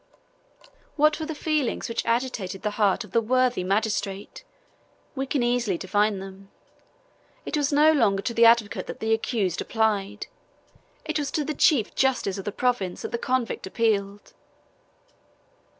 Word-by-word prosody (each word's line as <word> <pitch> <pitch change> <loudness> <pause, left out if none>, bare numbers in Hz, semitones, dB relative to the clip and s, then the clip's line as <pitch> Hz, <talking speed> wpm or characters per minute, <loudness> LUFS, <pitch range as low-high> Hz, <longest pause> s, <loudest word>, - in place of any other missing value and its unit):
What 305 +1 +3
were 315 - -4
the 320 - -4
feelings 300 -3 -1
which 230 - -3
agitated 230 -6 -2
the 210 - -1
heart 205 +3 +3
of 210 - -14
the 230 - +2
worthy 250 -2 +1
magistrate? 200 0 -2 0.7
We 270 0 -3
can 265 -2 0
easily 240 -6 0
divine 205 +3 +1
them. 195 +1 -10 1.0
It - - -3
was 290 -1 0
no 300 +2 +5
longer 205 -10 +2
to 235 - -2
the 230 0 +5
advocate 230 -2 +2
that - - -7
the 220 0 +1
accused 215 -5 -1
applied; 210 -2 -1 0.8
it 310 0 -1
was 285 -2 -2
to 300 - 0
the 305 - -2
chief 275 -7 +3
justice 250 -7 0
of 195 - -7
the 205 - -2
province 220 -7 -1
that - - -5
the 235 - -2
convict 255 -6 -2
appealed. 205 -2 -1
230 Hz, 155 wpm, -25 LUFS, 200-260 Hz, 1.0 s, no